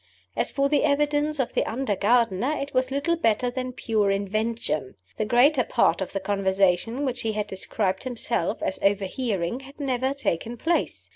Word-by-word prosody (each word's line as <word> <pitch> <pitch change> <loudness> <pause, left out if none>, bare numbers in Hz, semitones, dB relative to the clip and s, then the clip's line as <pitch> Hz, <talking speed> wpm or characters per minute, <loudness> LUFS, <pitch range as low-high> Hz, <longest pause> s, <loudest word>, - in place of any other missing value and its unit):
As - - 0
for 275 0 +1
the 290 +1 +2
evidence 295 +1 +1
of 260 - -1
the - - +2
under 235 -3 -1
gardener, 230 +5 +2
it 280 +1 -5
was 255 0 +1
little 280 +5 0
better 245 -4 +1
than 255 0 -3
pure 220 -4 0
invention. 200 - -1 0.2
The 215 - 0
greater 250 +5 +4
part - - +2
of 190 - -3
the 195 - -2
conversation 195 +5 +1
which 250 -2 -2
he 220 -1 -1
had 210 -1 -1
described 190 -1 -2
himself 235 -7 -2
as 190 - -2
overhearing 200 +1 0
had 275 +2 -14
never 265 -1 0
taken 235 -2 -2
place. 335 +8 -1
235 Hz, 170 wpm, -25 LUFS, 200-270 Hz, 0.2 s, greater